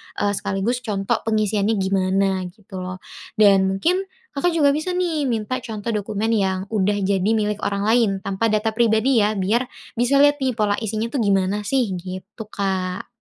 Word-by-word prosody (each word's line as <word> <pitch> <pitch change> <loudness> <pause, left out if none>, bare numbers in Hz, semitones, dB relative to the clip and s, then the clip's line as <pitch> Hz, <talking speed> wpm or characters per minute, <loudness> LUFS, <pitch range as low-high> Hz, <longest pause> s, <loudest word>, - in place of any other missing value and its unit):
eee, 205 - 0
sekaligus 200 +4 -1
contoh 215 -1 -1
pengisiannya 215 0 +1
gimana 190 -1 +1
gitu 195 -3 -10
loh. 185 0 -7 0.3
Dan 195 -3 +5
mungkin 320 - +1 0.4
Kakak 350 +6 +1
juga 285 -3 +4
bisa 310 +4 -2
nih 335 -5 0
minta 235 +2 -1
contoh 220 -1 -4
dokumen 210 +1 -2
yang 190 -4 +1
udah 205 -1 +1
jadi 190 -1 +1
milik 210 -1 -1
orang 200 0 -2
lain, 220 -4 +3
tanpa 195 +4 0
data 215 +1 +1
pribadi 230 +2 +3
ya 210 - +2
biar 205 +6 +1 0.3
bisa 245 +4 +2
liat 290 0 +4
nih 260 - +2
pola 210 -2 +1
isinya 220 +1 -2
tuh 275 - -1
gimana 200 +1 +1
sih, 250 -4 +1
gitu 185 +5 -8
Kak. 190 -2 -2
210 Hz, 170 wpm, -22 LUFS, 195-235 Hz, 0.4 s, Dan